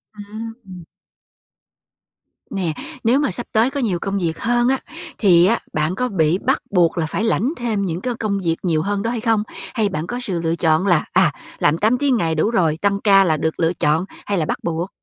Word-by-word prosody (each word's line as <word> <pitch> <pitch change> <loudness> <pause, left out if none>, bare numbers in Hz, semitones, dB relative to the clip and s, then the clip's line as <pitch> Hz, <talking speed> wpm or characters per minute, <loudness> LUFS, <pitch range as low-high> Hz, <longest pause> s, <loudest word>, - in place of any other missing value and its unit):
À! 210 -3 -9 1.7
Nè, 180 -5 -1 0.3
nếu 240 +4 +3
mà 290 - 0
sắp 240 - -3
tới 225 +3 +3
có 280 - -4
nhiều 205 -9 0
công 195 +2 -2
việc 165 -4 -2
hơn 240 +2 +1
á, 265 +1 +2 0.4
thì 175 -5 +5
á, 230 +5 +2
bạn 155 +4 0
có 250 +4 -1
bị 165 -4 +2
bắt - - 0
buộc 175 -3 +2
là 165 - +1
phải 180 +6 -2
lãnh 230 +5 +1
thêm 220 -5 -1
những 175 -1 -3
cái 250 +2 -2
công 200 -3 -1
việc 165 -1 +1
nhiều 165 -4 +1
hơn 200 +3 -1
đó 230 - -1
hay 240 - -2
không? 225 -2 +2 0.3
Hay 220 -4 +1
bạn 155 -2 -4
có 245 +4 -4
sự 185 -8 -3
lựa 165 0 0
chọn 165 +2 +2
là, 175 -5 +3
à, 180 -3 +4 0.3
làm 150 +2 +3
8 220 +7 +2
tiếng 275 -2 +2
ngày 165 -5 0
đủ 160 +7 +1
rồi, 165 -8 +2
tăng 200 0 +1
ca 195 -2 +6
là 160 -4 +1
được 160 +1 -2
lựa 165 +1 +2
chọn 160 +1 +1 0.2
hay 200 - -1
là 160 - 0
bắt - - -2
buộc? 170 +2 -2
195 Hz, 225 wpm, -20 LUFS, 165-225 Hz, 1.7 s, ca